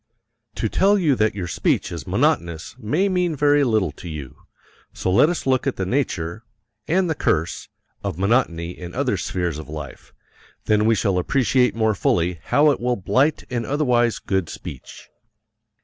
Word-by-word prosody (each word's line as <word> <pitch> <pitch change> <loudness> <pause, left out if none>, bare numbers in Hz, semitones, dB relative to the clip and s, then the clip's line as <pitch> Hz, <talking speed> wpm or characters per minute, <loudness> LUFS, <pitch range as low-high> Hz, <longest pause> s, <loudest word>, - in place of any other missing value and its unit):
To - - -1
tell 200 +2 +3
you 165 -7 +3
that 110 0 +1
your 95 -3 -3
speech 80 - 0
is - - -7
monotonous 85 -1 0
may 150 - +1
mean 180 -4 0
very 145 0 +3
little 110 - +1
to 85 +4 -10
you, 70 -5 -7 0.6
so 95 - -2
let 100 - +5
us 175 - -3
look 130 0 +1
at 135 - 0
the 95 - -2
nature 95 -5 -2 0.4
and 180 +3 +2
the 160 - +1
curse 80 - -1 0.3
of 100 -5 -3
monotony 95 -5 +1
in 90 -1 -9
other - - 0
spheres 85 -4 -2
of 80 - -9
life, 75 -4 -8 0.5
then 105 0 +3
we 115 0 +4
shall 100 -4 +1
appreciate 125 +4 +2
more 110 -1 +2
fully 90 -2 0
how 150 +1 +4
it 140 - -2
will 125 +1 0
blight 130 +10 +1
an 120 -2 -1
otherwise 125 -4 +1
good 95 -4 -2
speech. 65 - -9
110 Hz, 170 wpm, -22 LUFS, 90-140 Hz, 0.6 s, let